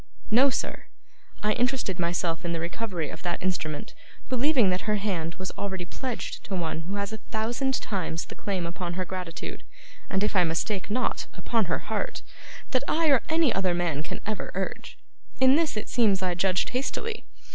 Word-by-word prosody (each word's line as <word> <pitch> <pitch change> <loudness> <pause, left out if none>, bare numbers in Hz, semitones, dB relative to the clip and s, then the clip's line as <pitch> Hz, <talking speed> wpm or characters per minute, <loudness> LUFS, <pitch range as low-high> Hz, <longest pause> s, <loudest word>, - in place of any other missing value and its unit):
'No, 255 +5 +7
sir. - - -2 0.6
I 210 - +4
interested 245 -7 +1
myself 170 -1 0
in 170 -1 -1
the 165 - -1
recovery 175 -1 -2
of - - -8
that 175 -1 -2
instrument, 185 - -1 0.4
believing 255 -5 +4
that 185 +4 -1
her 210 - +4
hand 180 -6 -1
was 185 0 -4
already 190 -3 -2
pledged 250 +6 -4
to 195 - -3
one 165 -3 -1
who 185 +5 -4
has 200 +1 -2
a - - -3
thousand 240 +4 +1
times 175 -4 -2
the - - -9
claims 190 -4 -2
upon 170 +1 -3
her 185 +1 -1
gratitude, 180 -2 -5 0.5
and, 190 0 +1
if 210 - +1
I 180 - +6
mistake 175 +5 0
not, 250 +5 0
upon 225 -3 +1
her 165 - +1 0.2
heart, 210 - -2 0.5
that 255 0 +3
I 325 0 +3
or 270 - +6
any 320 -5 +4
other 185 -2 +2
man 170 -4 0
can 155 - -5
ever 215 -1 -2
urge. 190 0 -3 0.4
In 260 0 +7
this 315 -7 +2
it 215 - -2
seems 205 -6 +3
I 180 -1 +2
judged 185 +1 +2
hastily. 435 - -2
195 Hz, 185 wpm, -28 LUFS, 175-235 Hz, 0.6 s, No